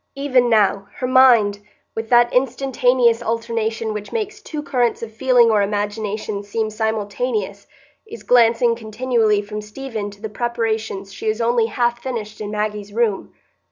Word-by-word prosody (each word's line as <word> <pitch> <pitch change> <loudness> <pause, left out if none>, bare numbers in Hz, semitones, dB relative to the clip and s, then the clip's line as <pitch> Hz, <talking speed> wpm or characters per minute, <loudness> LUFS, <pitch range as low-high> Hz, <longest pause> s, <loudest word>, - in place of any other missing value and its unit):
Even 260 -3 +2
now, 205 -3 +2
her 255 - -3
mind, 245 -6 +5 0.4
with 225 0 -4
that 240 0 +4
instantaneous 250 -2 +2
alternation 230 -1 -2
which 210 -1 -6
makes 435 -1 -4
two 305 -7 -6
currents 245 -5 0
of 225 -1 -7
feeling 245 -1 +4
or 210 -2 +3
imagination 205 0 -2
seem 215 +2 -3
simultaneous, 215 -1 -2 0.4
is 460 +2 -10
glancing 235 -1 +4
continually 220 -2 0
from 210 +1 -6
Stephen 215 -1 -6
to 200 0 -15
the 220 - -5
preparations 220 -3 -3
she 220 - -6
has 215 +1 0
only 235 -1 +2
half 240 +1 -1
finished 220 -5 -5
in 205 - -4
Maggie's 210 -1 -3
room. 220 -2 -1
225 Hz, 150 wpm, -20 LUFS, 210-245 Hz, 0.4 s, mind